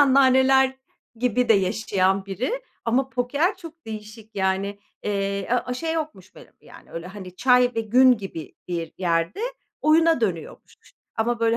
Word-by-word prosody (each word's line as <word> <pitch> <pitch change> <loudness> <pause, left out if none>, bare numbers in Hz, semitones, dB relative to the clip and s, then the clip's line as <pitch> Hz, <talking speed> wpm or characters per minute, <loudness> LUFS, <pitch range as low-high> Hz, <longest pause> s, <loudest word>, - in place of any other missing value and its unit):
anneanneler 265 -1 +5 0.4
gibi 250 0 +1
de 225 - +7
yaşayan 195 -1 +1
biri 255 - -3 0.2
ama 255 +3 +1
poker 285 - 0
çok 330 -4 -12
değişik 215 0 -9
yani, 195 +1 0 0.2
eee, 200 -1 -2
a 250 - +4
a 250 - -3
şey 320 +5 -2
yokmuş 295 - -5
benim - - -15
yani - - -16
öyle, 165 +1 -6
hani, 185 -2 -10
çay 250 +1 +4
ve 225 - 0
gün 250 +4 +5
gibi 180 -6 -8
bir 170 -2 -3
yerde 170 - 0 0.4
oyuna 320 -2 +4
dönüyormuş 180 -7 -4 0.4
ama, 230 +1 0
böyle, 230 0 +3
225 Hz, 150 wpm, -24 LUFS, 195-265 Hz, 0.4 s, de